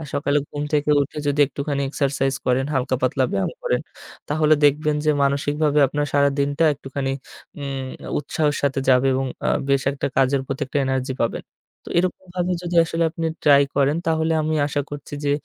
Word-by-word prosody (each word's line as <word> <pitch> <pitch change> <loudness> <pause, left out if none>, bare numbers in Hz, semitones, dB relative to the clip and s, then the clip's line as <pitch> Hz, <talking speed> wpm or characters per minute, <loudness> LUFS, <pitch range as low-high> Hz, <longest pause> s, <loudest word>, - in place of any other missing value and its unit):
আর 155 - -7
সকালে 145 0 +1
ঘুম 145 0 -4
থেকে 150 0 +1
উঠে 140 - -6
যদি 145 +1 +1
একটুখানি 140 +1 -3
এক্সারসাইজ 135 -1 0
করেন, 125 +1 +2
হালকা 130 0 0
পাতলা 130 +1 +2
ব্যায়াম - - 0
করেন, - - 0 0.5
তাহলে 155 0 +4
দেখবেন 150 +1 +3
যে 155 - +4
মানসিকভাবে 145 +2 +1
আপনার 145 +2 -1
সারাদিনটা 140 +1 +2
একটুখানি 135 0 -4 0.5
উম 135 -2 -4 0.3
উৎসাহের 150 0 -1
সাথে 135 -1 +1
যাবে 130 +1 +5
এবং 135 +1 0 0.2
আ - - +1 0.2
বেশ 140 -1 +2
একটা 140 - -3
কাজের 135 +1 +3
প্রতি 135 - -4
একটা 145 - -2
এনার্জি 130 0 -1
পাবেন। 115 - -1 0.4
তো - - -9
এরকমভাবে 180 0 -2
যদি 175 0 -4
আসলে 165 +1 -1
আপনি 165 -1 -3 0.2
ট্রাই 140 -1 +7
করেন, 145 +2 +3
তাহলে 160 0 +1
আমি 155 +1 -1
আশা 145 0 -1
করছি 145 0 -7
যে, 145 - +1
145 Hz, 175 wpm, -22 LUFS, 135-150 Hz, 0.5 s, ট্রাই